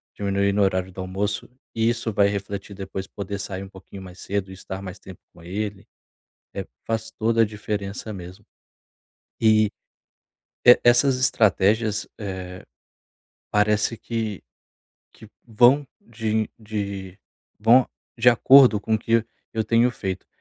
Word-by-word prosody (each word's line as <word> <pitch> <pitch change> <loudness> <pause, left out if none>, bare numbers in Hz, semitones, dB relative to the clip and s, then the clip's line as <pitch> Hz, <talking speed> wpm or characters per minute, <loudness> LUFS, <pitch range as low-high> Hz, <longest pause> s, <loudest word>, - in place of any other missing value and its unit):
diminuir 100 0 0
no 100 - +1
horário 95 -1 +1
do 95 - -7
almoço, 100 +2 -3 0.3
isso 115 0 0
vai 100 0 +4
refletir 100 0 -5
depois, 95 0 -6
poder 100 0 -6
sair 95 -1 -5
um 95 - -10
pouquinho 95 0 -12
mais 90 0 -12
cedo 100 -1 -3
e - - -8
estar 95 +1 -7
mais 95 +1 -8
tempo 95 -1 -12
com 85 - -17
ele, 100 +2 -5 0.7
eh, - - -4 0.2
faz 110 0 -2
toda 115 +1 +1
a - - +3
diferença 105 0 -5
mesmo. 95 +2 -10 1.0
E, 110 -1 +5 1.0
e 125 - +9
essas 125 +2 +4
estratégias, 110 -3 +2
eh, 95 -3 -7 0.9
parece 105 +2 +2
que 110 -2 -4 0.7
que 110 - -15 0.2
vão 125 +5 +4
de 110 -1 -2
de 100 -3 -5 0.4
vão 120 +4 +6 0.3
de 125 +2 +6
acordo 125 -2 +6
com 110 - -1
o - - +2
que 115 0 +1 0.3
eu 110 - 0
tenho 115 +3 +3
feito, 95 -5 -5
105 Hz, 140 wpm, -23 LUFS, 95-115 Hz, 1.0 s, e